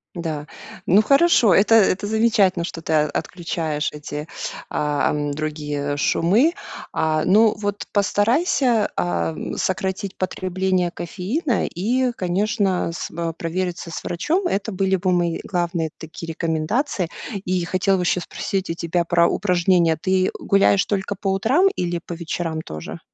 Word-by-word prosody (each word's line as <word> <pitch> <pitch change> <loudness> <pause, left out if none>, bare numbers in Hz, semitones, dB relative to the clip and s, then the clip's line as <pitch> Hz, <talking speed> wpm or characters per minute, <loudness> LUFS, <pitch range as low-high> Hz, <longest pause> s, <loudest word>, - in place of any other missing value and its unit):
Да. 155 -4 -4 0.4
Ну, 195 +5 +5
хорошо. 275 - +5
Это 215 +3 +5
это 205 -2 +3
замечательно, 215 -5 +2
что 165 -1 -6
ты 160 - -3
о 150 -1 +3
отключаешь 160 -4 -2
эти, 150 0 -6 0.4
а, 150 -1 0
ам, 145 -1 -1
другие 150 -1 -3
шумы. 210 - +3 0.4
А, 155 -1 +1
ну 215 +3 +5
вот 205 -1 -3
постарайся, 230 - +2
ам, 85 -2 -2
сократить 190 0 -2
потребление 185 -1 -1
кофеина 210 - -2
и 245 +8 0
конечно 195 -1 0
с 165 - -5
в 165 0 -3
провериться 175 +1 -3
с - - -5
врачом. 330 - -1
Это 200 +2 -2
были 190 0 +1
бы 185 0 0
мои 175 -2 0
главные 175 -3 -1
такие 165 +1 -9
рекомендации. 165 - -1 0.4
И 180 -1 0
хотела 185 +2 +1
бы 180 - -1
ещё 180 0 +1
спросить 190 +2 -3
у - - -1
тебя 170 +1 -1
про 170 0 +3
упражнения. 175 -3 +2
Ты 185 +2 +1
гуляешь 195 0 +3
только 200 0 -2
по 195 0 -1
утрам 265 - +3
или 175 -1 -1
по 175 - -6
вечерам 165 -1 -3
тоже? 80 - -8
180 Hz, 145 wpm, -22 LUFS, 165-205 Hz, 0.4 s, Ну